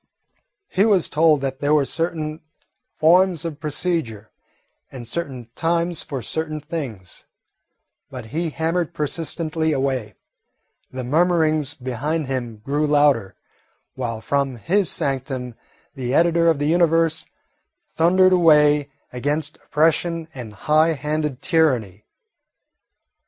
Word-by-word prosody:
He 190 - +1
was 205 -6 +3
told 155 -2 +3
that 135 -1 -3
there 145 +1 +2
were 145 -2 +3
certain 160 0 -3 0.6
forms 175 +1 +4
of 155 -3 -5
procedure, 150 - -2 0.6
and 120 -3 -8
certain 130 -5 -5
times 170 0 0
for 135 -6 -6
certain 155 -1 -3
things, 130 - -7 0.8
but - - -8
he 165 +1 -1
hammered 165 +2 -2
persistently 160 +1 -2
away, 130 -7 -2 0.8
the 130 0 -5
murmurings 155 0 +1
behind 140 +5 -3
him 125 -4 -4
grew 145 +2 0
louder, 145 -10 +2 0.6
while 115 -4 -4
from 140 -1 -1
his 175 - 0
sanctum 130 -3 -3 0.4
the 130 -2 -3
editor 170 0 +3
of 165 -3 +4
the 145 - -1
Universe 165 0 +2 0.7
thundered 185 +3 +4
away 150 -4 +4 0.2
against 145 +4 -2
oppression 165 +1 0
and 120 -5 -8
high 155 +2 +4
handed 150 -2 -3
tyranny. 125 - +1
150 Hz, 115 wpm, -22 LUFS, 130-165 Hz, 0.8 s, forms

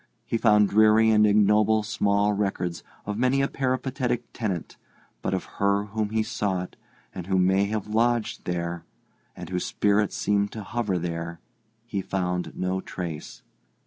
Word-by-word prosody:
He - - -2
found 105 -3 +5
dreary 110 +1 +5
and 105 -1 +5
ignoble 105 +1 +4
small 105 -1 +1
records 95 -4 -2 0.2
of 105 +1 -3
many 130 +2 +2
a - - +2
peripatetic 130 -2 -1
tenant; 100 -8 -3 0.5
but - - -1
of - - -3 0.2
her 100 0 +3
whom 105 0 -3
he 110 0 0
sought, 95 -4 -2 0.4
and 90 -1 -7
who 95 -1 +1
may 95 +2 +3
have 105 0 -2
lodged 115 +1 0
there, 85 -1 -3 0.5
and - - -8
whose 90 -1 -2
spirit 105 0 +2
seemed 100 0 0
to 110 - -6
hover 105 -3 -1
there, 85 0 -4 0.5
he 100 -5 -3
found 90 -2 -2
no 95 +1 -1
trace. 85 -6 -7
105 Hz, 150 wpm, -26 LUFS, 95-110 Hz, 0.5 s, found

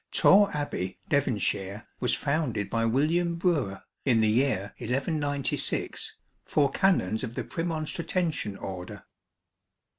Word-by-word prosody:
TOKKE 200 -2 +6
Abbey, 95 -11 -3
Devonshire, 105 - 0
was 125 - +2
founded 140 -10 -1
by 115 0 +1
William 165 +8 +2
Brewer, 155 - 0 0.2
in 120 -5 +3
the 110 -1 +3
year 110 -5 +1
1196, 140 +3 -1 0.3
for 145 -2 +2
Canons 120 - +2
of 120 -2 -5
the - - -2
Premon 165 -2 -3
stratensian 160 - -2
Order. 90 -2 -7
135 Hz, 115 wpm, -28 LUFS, 110-160 Hz, 0.3 s, TOKKE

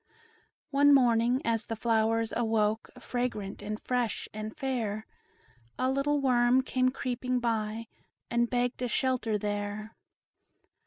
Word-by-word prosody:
One 285 0 +6
morning, 245 +1 +3
as 225 -1 0
the 225 - -3
flowers 225 0 +1
awoke, 220 -2 +1
Fragrant, 245 -5 -3
and 210 +1 -4
fresh, 245 -4 -1
and 215 0 -6
fair, 225 -5 -2 0.7
A 255 +1 +1
little 285 +2 +1
worm 250 -1 +4
came 255 0 +2
creeping 255 -1 -2
by, 225 -1 -1 0.5
And 235 0 +2
begged 245 0 0
a 250 - 0
shelter 245 -3 0
there. 205 +1 -4
235 Hz, 120 wpm, -29 LUFS, 220-255 Hz, 0.7 s, One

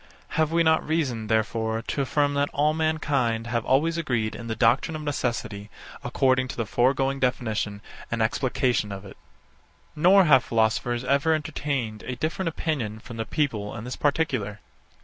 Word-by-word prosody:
Have 155 -1 +1
we 170 0 +3
not 160 -1 +3
reason, 135 -9 -1
therefore, 110 +1 0
to 140 - -2
affirm 145 +1 +1
that 145 0 +1
all 150 +2 +2
mankind 145 -8 0
have 115 0 -1
always 160 +7 +2
agreed 120 -9 -1
in 115 - -7
the 110 - -2
doctrine 125 +8 +2
of 155 - -5
necessity 115 -7 -3 0.3
according 130 +1 +2
to - - -7
the 115 - -1
foregoing 135 +4 +1
definition 110 -5 -1 0.3
and 115 - -2
explication 125 -1 0
of 100 0 -7
it? 95 - -11 0.8
70. - - -25
Nor 190 +3 +7
have 135 -7 +5
philosophers 115 +2 0
ever 140 +5 +2
entertained 140 -7 -3
a 125 - -3
different 165 +6 -2
opinion 140 -10 -2
from 115 +1 -10
the 110 - -2
people 110 -10 -2
in 110 - -6
this 125 +2 -5
particular. 130 -9 0
130 Hz, 170 wpm, -25 LUFS, 115-150 Hz, 0.8 s, Nor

